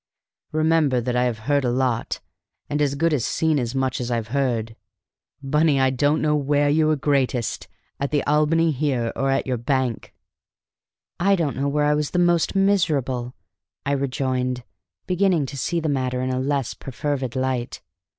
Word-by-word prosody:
Remember 155 -4 +2
that 120 +1 -2
I 125 0 +2
have 120 -3 -1
heard 145 0 +2
a 125 - +1
lot, 125 -2 -1 0.5
and 145 +1 0
as 140 -1 +1
good 165 +2 +1
as 135 -6 +1
seen 160 +2 +1
as 120 0 -3
much 130 -1 0
as 120 - -3
I've 115 -3 -2
heard. 120 -4 -1 0.7
Bunny, 150 +1 +2
I 130 0 +3
don't 145 +5 +1
know 150 -1 +2
where 145 0 +2
you 155 +1 +3
were 155 - +3
greatest: 135 -5 0 0.3
at 140 0 -1
the 145 -2 0
Albany, 155 +2 +3
here, 130 -5 -1
or 135 0 0
at 135 0 +1
your 130 -1 -1
bank!" 120 -5 -2 1.0
"I 195 +3 +4
don't 160 -6 -1
know 140 +2 -1
where 145 +1 +1
I 150 - +3
was 150 +2 -2
most 175 +1 +2
miserable," 140 -11 +1 0.5
I 140 - 0
rejoined, 130 -2 -1 0.4
beginning 180 -4 +2
to 135 - -7
see 170 +5 -1
the 160 - -2
matter 130 -3 -1
in 130 - -1
a 130 - -1
less 135 -2 -1
perfervid 135 -1 -4
light. 130 -2 -2
140 Hz, 175 wpm, -23 LUFS, 125-150 Hz, 1.0 s, I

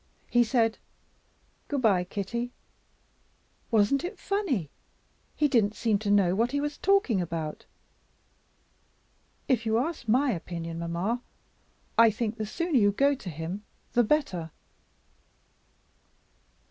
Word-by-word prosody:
He 240 0 +5
said 225 -1 +1 0.9
'Good 280 -3 -2
by, 195 -5 +4
Kitty!' 235 +6 -3 1.2
Wasn't 225 +4 +3
it 355 - -5
funny? 305 - -1 0.6
He 300 - +3
didn't 220 -6 +2
seem 215 -3 +1
to 210 -1 -3
know 200 -3 +4
what 230 +6 +1
he 285 - +1
was 295 0 -3
talking 390 - +3
about. 165 -3 -5 1.8
If 245 -4 +2
you 220 0 +1
ask 290 0 -2
my 255 +5 +3
opinion, 170 -3 -5
mamma, 175 +8 -2 0.8
I 230 0 +8
think 220 +1 -2
the 215 - -3
sooner 335 +3 +1
you 205 -2 +4
go 280 +7 +3
to 260 -9 -7
him 165 +6 -5 0.3
the 240 - +4
better." 210 - 0
225 Hz, 120 wpm, -28 LUFS, 190-265 Hz, 1.8 s, I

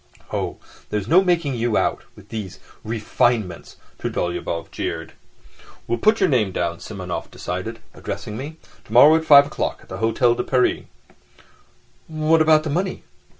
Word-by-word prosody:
"Oh, - - -2 0.3
there's 105 -1 -2
no 180 +8 +5
making 170 -6 +1
you 120 -2 0
out... - - 0
with 105 - -16
these 105 -5 -6 0.2
refinements," 110 -4 -1 0.2
Trudolyubov 85 -1 -3
jeered. - - -4 0.7
"We'll 120 - -1
put 215 +1 +3
your 190 - +4
name 120 - +2
down," 85 -2 -2
Simonov 95 -4 -6
decided, 95 +6 -5 0.2
addressing 105 - -6
me. 145 +7 -7 0.3
"Tomorrow 140 +8 +6
at 160 - -4
five 140 -2 +8
o'clock 145 - -3
at - - -22
the - - -6
Hôtel 120 +2 +2
de - - -1
Paris." 130 -1 +1 1.2
"What 155 0 +2
about 155 -1 +5
the 155 - -3
money?" 180 +4 -2
120 Hz, 150 wpm, -22 LUFS, 105-155 Hz, 1.2 s, five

